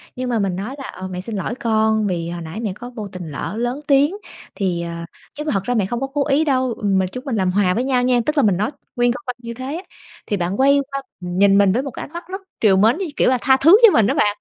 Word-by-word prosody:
nhưng 255 0 -3
mà 235 - 0
mình 195 -3 -1
nói 210 +8 -5
là, 275 - -7
ờ, 185 - -7
"Mẹ 180 -1 -5
xin 215 +3 -6
lỗi 195 +5 -3
con 220 -2 +1
vì 170 -3 -2
hồi 175 0 -5
nãy 165 +5 -7
mẹ 215 -5 -3
có 245 +3 -9
vô 220 -4 -7
tình 180 -4 -7
lỡ 165 +8 -5
lớn 245 +4 -2
tiếng, 285 +5 +3 0.4
thì, 180 -4 -1
ờ 170 0 -5 0.3
chứ 300 - -5
mà 305 - -2
thật 195 -2 0
ra 245 - -1
mẹ 210 -5 +1
không 240 +4 -3
có 270 - -1
cố 280 +1 -1
ý 295 +2 +3
đâu, 260 -4 +1
ừm, 195 -2 +1
mà 185 - +1
chúng 255 +8 -8
mình 260 -5 -2
làm 185 -3 +1
hòa 185 -1 +2
với 240 - 0
nhau 255 -2 +1
nha." 250 -1 +3
Tức 300 0 -1
là 280 - +4
mình 200 -4 +3
nói 210 +7 -1 0.2
nguyên 245 -1 +3
câu 250 - -5
văn 250 - -3
như 235 -1 -7
thế 260 +5 -5
á, 350 - -6 0.4
thì 205 - -1
bạn 180 +3 -2
quay 280 +1 +5
qua 275 0 -3 0.2
nhìn 190 +3 +3
mình 200 -1 +5
với 240 +7 +1
một 275 - -5
cái - - -7
ánh 300 - -17
mắt 345 +1 -6
rất 380 +2 -6 0.2
trìu 200 -4 +5
mến 220 +7 +4
như, 385 - -2
kiểu - - +3
là, 255 - +3
tha 265 0 +4
thứ 325 +9 +7
cho 435 - +8
mình 220 - +4
á - - +1
bạn. 205 0 +2
230 Hz, 310 wpm, -20 LUFS, 190-265 Hz, 0.4 s, cho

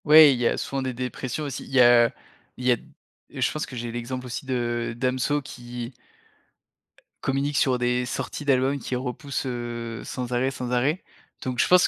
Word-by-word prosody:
Ouais. 150 -1 +9
Il 125 - -2
y 120 - +3
a - - +1
souvent 135 -1 -2
des 130 -1 -2
dépressions 125 +3 -3
aussi. 135 -2 -4
Il - - -13
y 135 - +4
a 120 -1 +7 0.5
il 125 - -6
y 125 - +5
a - - +6
d - - -15 0.5
je 130 -1 0
pense 155 - -2
que 130 - -9
j'ai 120 0 -3
l'exemple 125 +2 -4
aussi 125 +2 -5
de 120 -2 -1
Damso, 130 +3 +1
qui 120 -2 -7 1.3
communique 140 +2 0
sur 130 -2 +3
des 125 0 +1
sorties 145 +2 -4
d'albums, 135 0 +3
qui 130 - -3
repousse, 135 +3 -3
heu, 120 -2 -4
sans 125 -1 -4
arrêt, 125 +2 +2
sans 125 -2 -5
arrêt. 135 +8 +1 0.4
Donc 125 -1 -3
je - - +4
pense 180 0 +6
125 Hz, 195 wpm, -25 LUFS, 120-135 Hz, 1.3 s, Ouais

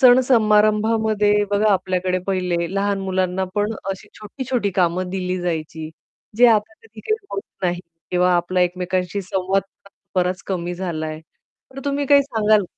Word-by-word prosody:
सण-समारंभामध्ये 220 -4 +4 0.2
बघा 205 +1 +3
आपल्याकडे 185 -1 0
पहिले 180 -2 -1
लहान 200 0 0
मुलांना 190 0 -1
पण 210 +2 0 0.2
अशी 190 - -7
छोटी-छोटी 235 0 -2
कामं 180 +1 +1
दिली 185 -1 -2
जायची. 160 -2 -4 0.5
जे 245 +1 +7
आता 220 -1 +2
कधी-कधी 225 - -4
होत 395 - -3 0.2
नाही 175 -1 0 0.3
किंवा 180 0 +3
आपला 175 +1 +1
एकमेकांशी 180 +1 -1
संवाद 190 +1 0 0.5
बराच 180 0 0
कमी 175 -2 -3
झालाय. 160 -4 -4 0.5
पण 270 - -8
तुम्ही 285 0 -1
काय 285 0 +6
सांगाल 215 -5 +2
190 Hz, 130 wpm, -21 LUFS, 180-215 Hz, 0.5 s, जे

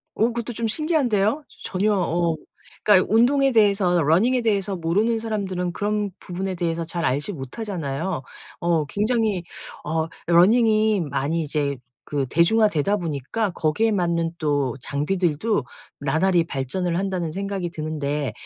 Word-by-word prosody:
어 220 - +2
그것도 235 0 -3
좀 230 0 -2
신기한데요. 270 - +1 0.2
전혀 205 +3 +1
어 170 -2 +1 0.5
그러니까 200 -3 +5
운동에 270 +4 +4
대해서 200 -5 +3
running에 195 - +3
대해서 200 -3 0
모르는 205 +8 +1
사람들은 190 -5 -2
그런 210 0 -1
부분에 185 +1 -4
대해서 170 -1 -2
잘 170 +1 -3
알지 145 +8 0
못하잖아요. 165 - -4 0.4
어 170 -3 +1
굉장히 210 - 0 0.4
어 160 +1 -1 0.2
running이 215 +3 +4
많이 145 +5 0
이제 145 -2 -1 0.3
그 140 -2 -2
대중화 210 - +4
되다 195 +5 +1
보니까 170 - -2
거기에 180 +7 +1
맞는 170 -3 0
또 145 -6 0
'장비들도 160 - 0 0.4
나날이 170 +6 +2
발전을 170 +5 -2
한다.'는 185 -4 -2
생각이 195 0 -3
드는데 150 -3 -3
180 Hz, 350 characters per minute, -23 LUFS, 160-215 Hz, 0.5 s, 그러니까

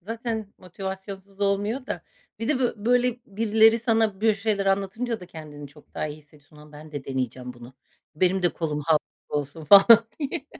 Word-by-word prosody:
zaten 220 +1 -5
motivasyonsuz 190 +2 -8
olmuyor 205 +6 0
da. - - -4 0.4
Bir 225 - -3
de 300 - +2
bö 245 - +1
böyle 245 +3 +1
birileri 220 +2 +4
sana 225 -4 +1
bö 220 -1 +3
şeyler 205 -1 -1
anlatınca 200 +4 -1
da 180 - -10
kendini 150 -4 -10
çok 145 +1 -20
daha - - -2
iyi 150 - -7
hissediyorsun. 150 0 -21
"Lan, 150 0 -15
ben 150 +1 -12
de 145 -2 -6
deneyeceğim 125 -1 -4
bunu, 120 +1 -13 0.4
benim 185 +3 +1
de 175 - +4
kolum 150 -3 -3
Hulk 155 +1 +2
gibi - - -29
olsun." 145 +2 -5
falan 210 +7 +8
diye. 285 -1 -4
195 Hz, 180 wpm, -25 LUFS, 150-225 Hz, 0.4 s, falan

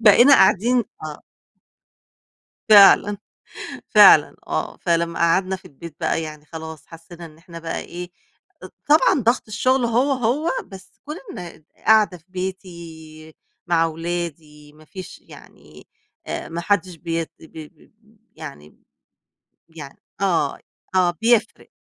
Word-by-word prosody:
بقينا 240 +6 +7
قاعدين 240 +4 +3 0.2
آه. 150 -1 -8 1.5
فعلًا، 205 -1 +7 0.7
فعلًا - - +7
آه، - - -3
فلمّا 170 -1 -1
قعدنا 185 +3 +2
في 185 - -16
البيت 155 +2 -12
بقى 165 -1 -1
يعني 155 -1 -9
خلاص 160 -1 -9
حسّينا 170 +1 -12
إن 155 -1 -15
إحنا 170 0 -12
بقى 165 0 -4
إيه، 175 +1 -8 0.5
أض - - -9 0.2
طبعًا 300 -1 +4
ضغط 235 +3 +1
الشغل 255 +4 +1
هو، 245 +5 +1
هو، 265 +5 0 0.2
بس 190 -1 -13
كون 300 +2 -6 0.2
إن 170 -3 -11 0.2
قاعدة 215 -4 +4
في 160 - -28
بيتي، 170 -4 -8 0.3
مع 165 -1 +2
ولادي 160 -3 -6
ما 155 0 -19
فيش 185 +3 -10
يعني، - - -17 0.4
آآ، - - -5
ما 170 +1 -5
حدش 185 -1 -1
بيت 165 -1 -4
ب - - -17
ب 155 -1 -13
ب 215 +1 -27 0.2
يعني 140 - -10
ب - - -28 1.0
يعني 140 -4 -11 0.2
آه، 170 -7 0
ي - - -28 0.3
آه، 180 -1 +3
بيفرق. 230 -1 +1
170 Hz, 135 wpm, -21 LUFS, 160-205 Hz, 1.5 s, بقينا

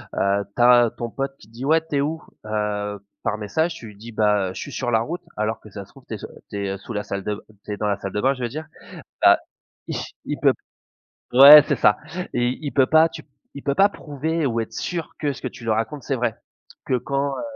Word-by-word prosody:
heu, 100 0 +1
tu 120 - -1
as 120 -1 +6
ton 120 -1 -3
pote 135 +2 -4
qui 105 - -17
dit: 120 +3 -9
«Quais 160 0 +5
tu 145 - -2
es 140 - +2
où?» 160 +3 -2 0.2
Heu, 105 -1 -2 0.2
par 110 - -1
message 160 +11 -1
tu 115 - -10
lui 105 - -13
dis: 115 +3 -10
«Bah 105 -3 +2
heu, - - -7
je - - -7
suis 145 - -7
sur 120 - -2
la 110 - +4
route», 170 +9 -4 0.2
alors 110 +1 -1
que 110 - -14
si - - -23
ça 100 - -6
se - - -24
trouve - - -18
tu - - -6
es - - -3
s - - -8 0.2
tu 100 - -6
es, - - -2
heu, - - -8
sous 115 +4 -9
la 105 0 -2
salle 100 -1 -4
de 105 - -1
b - - -10 0.3
tu 105 - -4
es - - -5
dans 105 - -1
la 100 - +1
salle 100 -1 -6
de 105 - -1
bain, 135 +1 +3
je 130 - -9
veux - - +1
dire 155 +5 -6 0.6
bah, - - +7 0.9
il - - -3
peut - - +5 0.8
Ouais, 145 +3 +11
c'est 145 - +2
ça. 105 -3 +4 0.4
Et 120 0 +1
il 145 - -3
peut 135 -2 +4
pas 160 +2 +5
tu 160 -1 -9
p - - -37 0.3
il 140 - -8
peut 140 - +1
pas 200 +4 +5
prouver 155 0 -3
ou 115 -3 0
être 110 - -7
sûr 170 -2 -4
que 145 -2 0
ce - - -12
que - - -2
tu 120 - -11
lui 115 - 0
racontes 115 +6 -2
c'est 135 - -1
vrai. 120 -2 -1 0.5
Que 130 - +1
quand 140 +3 -1
heu, - - -4
120 Hz, 275 wpm, -23 LUFS, 105-145 Hz, 0.9 s, Ouais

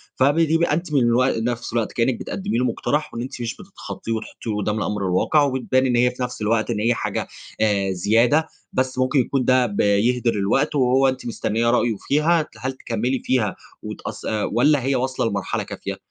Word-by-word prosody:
فبيبقى 160 +4 +3
أنتِ 160 0 -2
من 140 - +4
الوق 120 +1 +2
نفس 115 +1 -3
الوقت 115 -2 0
كأنِك 120 +1 +1
بتقدمي 195 - -3
له 125 - +1
مقترح، 150 +5 -1
وأن 115 - -4
أنتِ 125 0 -6
مش 115 -1 -3
بتتخطيه 185 - -8
وتحطيه 110 0 -4
قدام 105 +1 -1
الأمر 105 -2 -2
الواقع، 95 +11 +2
وبتبان 130 -1 +1
إن 125 -2 +1
هي 125 +1 +3
في 125 0 -5
نفس 125 -2 -5
الوقت 110 +2 +1
إن 115 -3 -1
هي 115 +3 +2
حاجة - - -3 0.3
آآ، 100 -3 +2
زيادة، 115 - +2 0.3
بس 130 0 -1
ممكن 130 +2 +2
يكون 130 +1 0
ده 130 -1 +4
بيهدر 115 +3 +2
الوقت، 135 +10 +1
وهو 130 0 +3
أنتِ 130 0 -2
مستنية 115 0 0
رأيه 120 -1 +2
فيها، 155 +2 +2
هل 130 - -3
تكمّلي 125 +1 -2
فيها 115 -7 0 0.3
وتقص - - -7
آآ، 110 -1 -1
والّا 140 +2 +2
هي 135 +1 +1
واصلة 130 0 -1
لمرحلة 100 -3 -2
كافية؟ - - -6
125 Hz, 185 wpm, -22 LUFS, 115-135 Hz, 0.3 s, من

